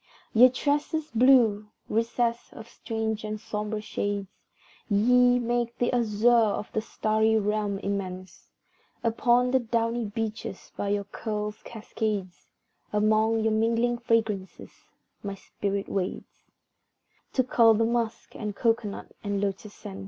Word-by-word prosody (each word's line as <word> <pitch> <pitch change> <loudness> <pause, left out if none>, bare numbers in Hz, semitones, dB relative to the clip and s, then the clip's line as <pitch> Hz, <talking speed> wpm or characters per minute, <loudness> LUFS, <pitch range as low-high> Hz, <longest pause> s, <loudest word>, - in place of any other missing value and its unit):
Ye 245 +3 +8
tresses 295 +4 -1
blue 230 -4 +4 0.2
recess 230 +1 -1
of 225 - -10
strange 220 -2 -3
and 215 0 -4
sombre 210 0 -4
shades, 205 -2 -3 0.6
Ye 245 +4 +4
make 240 -1 -1
the 245 - 0
azure 225 -2 +1
of 225 -3 +3
the 220 - 0
starry 220 0 +1
Realm 210 -1 0
immense; 185 -2 -5 0.5
Upon 240 +2 +2
the 260 - +4
downy 230 0 -1
beeches, 215 -2 -5
by 200 - -2
your 205 0 0
curls' 210 +1 -5
cascades, 210 -4 -4 0.4
Among 215 +1 +2
your 220 -1 +2
mingling 230 +2 +1
fragrances, 220 -5 -1 0.5
my 200 -1 -5
spirit 200 0 -4
wades 185 -2 -4 0.9
To 260 - +3
cull 230 -2 +5
the 225 +1 +2
musk 230 -1 -2
and 210 -2 -4
cocoa 230 -2 +1
nut - - -9
and 205 -1 -1
lotus 200 +1 -3
scents. 95 0 -9
220 Hz, 130 wpm, -27 LUFS, 205-235 Hz, 0.9 s, Ye